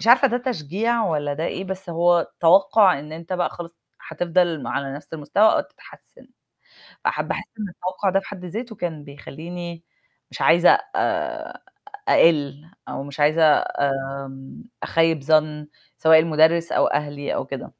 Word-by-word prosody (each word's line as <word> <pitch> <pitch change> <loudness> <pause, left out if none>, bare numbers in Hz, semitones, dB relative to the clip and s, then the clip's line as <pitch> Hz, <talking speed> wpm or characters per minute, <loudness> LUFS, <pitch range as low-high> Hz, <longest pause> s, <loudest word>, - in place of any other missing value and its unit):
مش - - -5
عارفة 250 +3 +6
ده 245 - -1
تشجيع 230 - -1
والَّا 145 -4 -1
ده 155 +3 -4
إيه؟ 190 - -4
بس 190 -1 -6
هو 170 0 +2
توقُع 190 +1 +5
إن 150 +2 -10
أنت 165 +2 -8
بقى 180 -1 0
خلاص 170 -1 -9 0.4
هتفضل 170 0 0
على 140 -1 -3
نفس 145 0 -12
المستوى، 160 +6 -1
أو - - +2
تتحسن. - - -16 0.8
فحابة - - -1
أحس - - -7
إن 205 - -3
التوقُع 185 +2 -3
ده 195 +1 +2
في - - -14
حد 190 -3 -9
ذاته 220 +5 -6
كان 160 -5 -5
بيخلّيني 165 +4 -9 0.5
مش - - -9
عايزة 175 +1 +5 0.3
آآ 385 - -2 0.5
أقِّل، 150 - +3 0.2
أو - - -5
مش 145 +1 -9
عايزة 155 +3 +3 0.4
آمم 135 0 -4 0.2
أخيِّب 165 -2 +1
ظن، 150 0 +1 0.3
سواء 160 -1 +6
المُدرّس، 165 +1 +3
أو - - +3
أهلي، 145 -1 -2
أو - - -2
كده. - - -7
165 Hz, 155 wpm, -22 LUFS, 150-185 Hz, 0.8 s, عارفة